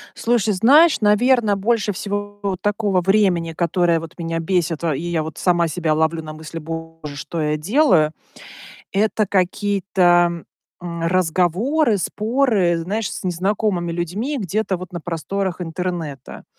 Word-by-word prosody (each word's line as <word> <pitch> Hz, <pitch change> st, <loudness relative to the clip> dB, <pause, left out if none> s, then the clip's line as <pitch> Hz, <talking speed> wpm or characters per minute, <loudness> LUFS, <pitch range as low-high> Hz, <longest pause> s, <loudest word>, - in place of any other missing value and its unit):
Слушай, 225 Hz, -3 st, +1 dB
знаешь, 280 Hz, -, +5 dB
наверно, 215 Hz, +1 st, +3 dB
больше 210 Hz, +1 st, 0 dB
всего 205 Hz, 0 st, -4 dB
такого 205 Hz, -2 st, +1 dB
времени, 180 Hz, -4 st, +2 dB
которое 170 Hz, 0 st, +1 dB
вот 165 Hz, +2 st, -10 dB
меня 165 Hz, -1 st, -3 dB
бесит, 170 Hz, -2 st, -1 dB
во 160 Hz, -4 st, +1 dB
и -, -, -4 dB
я 170 Hz, -2 st, -1 dB
вот 160 Hz, 0 st, -8 dB
сама 175 Hz, -2 st, +2 dB
себя 160 Hz, 0 st, -1 dB
ловлю 160 Hz, +1 st, 0 dB
на 155 Hz, 0 st, -7 dB
мысли: 155 Hz, +1 st, -8 dB
"Боже, 165 Hz, -2 st, -7 dB
что 155 Hz, +3 st, -5 dB
я 150 Hz, 0 st, 0 dB
делаю?"- 180 Hz, -, +3 dB, 0.8 s
это 215 Hz, +1 st, +1 dB
какие-то, 180 Hz, -3 st, +2 dB, 0.4 s
м, 170 Hz, -1 st, -6 dB
разговоры, 185 Hz, -, +1 dB
споры, 215 Hz, -3 st, +1 dB
знаешь, 200 Hz, +6 st, -3 dB
с -, -, -7 dB
незнакомыми 185 Hz, 0 st, -1 dB
людьми 200 Hz, -, -3 dB
где-то 200 Hz, 0 st, -1 dB
вот 185 Hz, +1 st, -9 dB
на 175 Hz, -, -5 dB
просторах 180 Hz, +3 st, -3 dB
интернета. 165 Hz, -5 st, -5 dB
180 Hz, 135 wpm, -20 LUFS, 165-205 Hz, 0.8 s, знаешь